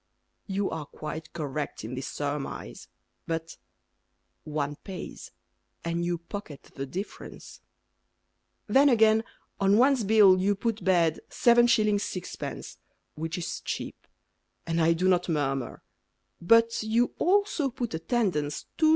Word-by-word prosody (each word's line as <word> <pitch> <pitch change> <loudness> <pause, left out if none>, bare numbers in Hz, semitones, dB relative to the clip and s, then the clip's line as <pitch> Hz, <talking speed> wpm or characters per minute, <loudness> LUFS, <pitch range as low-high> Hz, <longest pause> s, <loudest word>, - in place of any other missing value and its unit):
You 195 0 -1
are 155 -3 -5
quite 155 +2 -7
correct 150 -6 -4
in 115 - -6
this 130 +1 -4
surmise. 145 -1 -5 0.4
But 165 0 -4 0.9
One 150 -1 -3
pays, 190 -2 -8 0.6
And 170 0 -1
you 175 0 0
pocket 170 -3 -9
the 135 0 -5
difference. 190 +9 -8 1.0
Then, 280 +2 +5
again, 220 -2 +5 0.4
on 195 +1 +4
one's 260 0 +4
bill 200 -3 +6
You 200 +2 +2
put 220 0 -2
Bed, 170 -3 +3
7s. 235 -2 +4
6d. 205 -3 -3 0.4
Which 160 +2 -4
is 170 -1 -4
cheap; - - -6 0.6
And 165 0 0
I 165 +1 +4
do 180 +3 0
not 180 -1 +2
murmur; 135 -5 -2 0.6
But 230 +5 +4
you 225 +3 +1
also 375 -6 +2
put 245 -4 -4
Attendance, 160 - -1
2s. 315 -1 +5
185 Hz, 125 wpm, -27 LUFS, 160-220 Hz, 1.0 s, bill